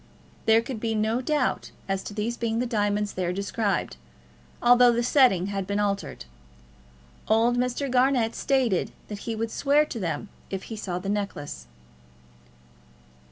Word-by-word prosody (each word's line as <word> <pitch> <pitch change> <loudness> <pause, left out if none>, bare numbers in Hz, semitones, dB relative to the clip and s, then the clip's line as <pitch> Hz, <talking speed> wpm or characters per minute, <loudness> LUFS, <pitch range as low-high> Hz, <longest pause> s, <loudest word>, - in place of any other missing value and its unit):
There 225 +1 +5
could 240 -2 -5
be 225 0 -1
no 220 +3 +1
doubt 290 -1 0 0.2
as 195 -1 -1
to - - -6
these 220 +3 -1
being 230 -1 -1
the 245 - 0
diamonds 210 -3 0
there 180 -1 -1
described, 200 - -1 0.6
although 245 0 +6
the 235 0 0
setting 240 -8 +4
had 195 -1 -3
been 200 +1 -1
altered. 200 - -2 1.0
Old 225 +3 +3
Mr. 250 +3 -1
Garnett 250 -3 +2
stated 255 -9 +1 0.2
that 205 -1 -5
he 225 - -1
would 225 +1 -3
swear 290 +2 +3
to 250 -6 -6
them 170 +1 -3 0.2
if 195 -1 -4
he - - -4
saw 190 -4 -4
the 180 +2 -6
necklace. 195 - -4
220 Hz, 155 wpm, -26 LUFS, 200-245 Hz, 1.0 s, although